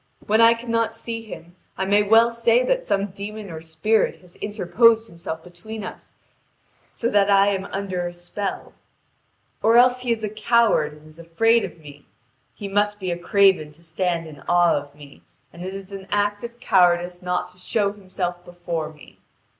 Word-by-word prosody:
When 220 Hz, +2 st, +3 dB
I 230 Hz, 0 st, +7 dB
cannot 230 Hz, -1 st, -1 dB
see 230 Hz, 0 st, -5 dB
him, 175 Hz, -6 st, -11 dB, 0.2 s
I 190 Hz, -, -1 dB
may 205 Hz, +2 st, +4 dB
well 225 Hz, +3 st, +5 dB
say 235 Hz, +1 st, +2 dB
that -, -, +1 dB
some 200 Hz, -, -1 dB
demon 205 Hz, 0 st, -7 dB
or 160 Hz, -1 st, -7 dB
spirit 165 Hz, +8 st, +1 dB
has 180 Hz, -1 st, -19 dB
interposed 220 Hz, +3 st, +3 dB
himself 165 Hz, -3 st, -7 dB
between 195 Hz, +5 st, -9 dB
us, -, -, -10 dB, 0.8 s
so 230 Hz, -, -2 dB
that 205 Hz, -1 st, +3 dB
I 200 Hz, 0 st, +5 dB
am 195 Hz, -1 st, -2 dB
under 190 Hz, -3 st, -3 dB
a -, -, -5 dB
spell. 175 Hz, +3 st, -6 dB, 0.9 s
Or 225 Hz, +1 st, +4 dB
else 250 Hz, +1 st, +5 dB
he 245 Hz, -1 st, -1 dB
is 225 Hz, -1 st, -1 dB
a 210 Hz, -, -1 dB
coward 215 Hz, -7 st, +2 dB
and 150 Hz, 0 st, -17 dB
is 155 Hz, +1 st, -15 dB
afraid 225 Hz, +8 st, +2 dB
of -, -, -6 dB
me: 145 Hz, -2 st, -14 dB, 0.5 s
he 205 Hz, -, -6 dB
must 205 Hz, +1 st, 0 dB
be 185 Hz, -2 st, -3 dB
a -, -, -1 dB
craven 190 Hz, -4 st, +3 dB
to 165 Hz, +3 st, -21 dB
stand 170 Hz, +1 st, -2 dB
in 150 Hz, -3 st, -12 dB
awe 175 Hz, -1 st, +4 dB
of 145 Hz, 0 st, -5 dB
me, 145 Hz, -1 st, -15 dB, 0.3 s
and 170 Hz, -, -9 dB
it 190 Hz, +1 st, -5 dB
is 195 Hz, 0 st, -9 dB
an 195 Hz, -1 st, -8 dB
act 205 Hz, 0 st, 0 dB
of 235 Hz, 0 st, -8 dB
cowardice 175 Hz, -3 st, +2 dB
not 180 Hz, 0 st, -2 dB
to 180 Hz, 0 st, -18 dB
show 200 Hz, +2 st, 0 dB
himself 185 Hz, -3 st, -5 dB
before 175 Hz, -3 st, -5 dB
me. 150 Hz, -2 st, -18 dB
195 Hz, 185 wpm, -23 LUFS, 175-220 Hz, 0.9 s, I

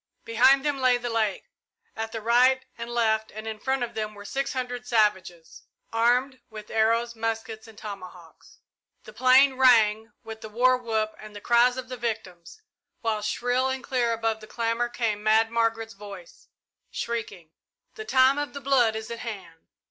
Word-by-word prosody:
Behind 260 Hz, +5 st, +4 dB
them 290 Hz, -2 st, 0 dB
lay 255 Hz, -1 st, +4 dB
the 240 Hz, 0 st, -5 dB
lake 220 Hz, -3 st, -1 dB, 0.5 s
at 225 Hz, 0 st, -4 dB
the 225 Hz, -1 st, -6 dB
right 250 Hz, +3 st, +4 dB
and 235 Hz, 0 st, -7 dB
left 220 Hz, -2 st, +1 dB
and 215 Hz, +1 st, -9 dB
in 220 Hz, -1 st, -5 dB
front 265 Hz, +1 st, -1 dB
of 240 Hz, -1 st, -5 dB
them 215 Hz, -1 st, -4 dB
were 205 Hz, 0 st, -11 dB
six 275 Hz, +5 st, -3 dB
hundred 245 Hz, -1 st, -4 dB
savages, 190 Hz, -8 st, 0 dB, 0.3 s
armed 245 Hz, +3 st, +2 dB
with 215 Hz, -1 st, -10 dB
arrows, 230 Hz, +2 st, +1 dB
muskets, 225 Hz, 0 st, -4 dB
and 220 Hz, -2 st, -15 dB
tomahawks. 185 Hz, -5 st, -11 dB, 0.5 s
The -, -, -13 dB
plain 260 Hz, +1 st, +5 dB
rang 225 Hz, -3 st, +4 dB
with 220 Hz, 0 st, -9 dB
the 220 Hz, -, -8 dB
war 250 Hz, +4 st, +3 dB
whoop 220 Hz, -3 st, -2 dB
and 215 Hz, -1 st, -12 dB
the -, -, -7 dB
cries 240 Hz, +3 st, +3 dB
of 255 Hz, 0 st, -5 dB
the 255 Hz, 0 st, -7 dB
victims, 225 Hz, -, -6 dB, 0.4 s
while 220 Hz, -2 st, -1 dB
shrill 245 Hz, +4 st, 0 dB
and 265 Hz, 0 st, -4 dB
clear 245 Hz, -3 st, 0 dB
above 225 Hz, -1 st, -1 dB
the 215 Hz, -, -12 dB
clamour 230 Hz, +1 st, -1 dB
came 225 Hz, -4 st, -2 dB
Mad 220 Hz, +1 st, +3 dB
Margaret's 225 Hz, -1 st, -1 dB
voice, 200 Hz, -3 st, -12 dB, 0.4 s
shrieking, 205 Hz, -8 st, -5 dB, 0.4 s
"The 435 Hz, -, -7 dB
time 265 Hz, -6 st, +4 dB
of 290 Hz, -, -4 dB
the 280 Hz, -, -6 dB
blood 260 Hz, -5 st, +2 dB
is 220 Hz, +1 st, -6 dB
at 230 Hz, -, -6 dB
hand!" 195 Hz, -8 st, -9 dB
230 Hz, 175 wpm, -26 LUFS, 215-250 Hz, 0.5 s, plain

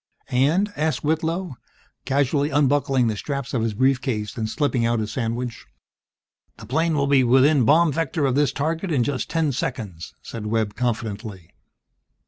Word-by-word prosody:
"And?" 160 Hz, +11 st, +2 dB
asked 155 Hz, +1 st, -1 dB
Whitlow, 160 Hz, 0 st, -1 dB, 0.5 s
casually 140 Hz, +1 st, +1 dB
unbuckling 140 Hz, -3 st, +2 dB
the 110 Hz, -2 st, 0 dB
straps 140 Hz, +4 st, -4 dB
of 120 Hz, -, 0 dB
his 110 Hz, -2 st, -1 dB
brief 130 Hz, +3 st, +2 dB
case 105 Hz, -6 st, -3 dB
and 110 Hz, -1 st, -3 dB
slipping 130 Hz, -1 st, 0 dB
out 115 Hz, 0 st, +1 dB
his 110 Hz, -1 st, -3 dB
sandwich. 120 Hz, 0 st, -4 dB, 0.9 s
"The 105 Hz, -, -11 dB
plane 160 Hz, +7 st, 0 dB
will 140 Hz, -1 st, +1 dB
be 140 Hz, -2 st, +4 dB
within 130 Hz, +2 st, +4 dB
bomb 160 Hz, +5 st, +5 dB
vector 160 Hz, -1 st, -1 dB
of 130 Hz, -, +1 dB
this 145 Hz, -1 st, +2 dB
target 165 Hz, +5 st, -2 dB
in 135 Hz, -6 st, +2 dB
just 135 Hz, +1 st, -2 dB
ten 160 Hz, -3 st, +1 dB
seconds!" 110 Hz, -10 st, -5 dB
said 110 Hz, -2 st, -6 dB
Webb, 110 Hz, -1 st, 0 dB
confidently. 110 Hz, -6 st, -4 dB
135 Hz, 160 wpm, -23 LUFS, 115-150 Hz, 0.9 s, bomb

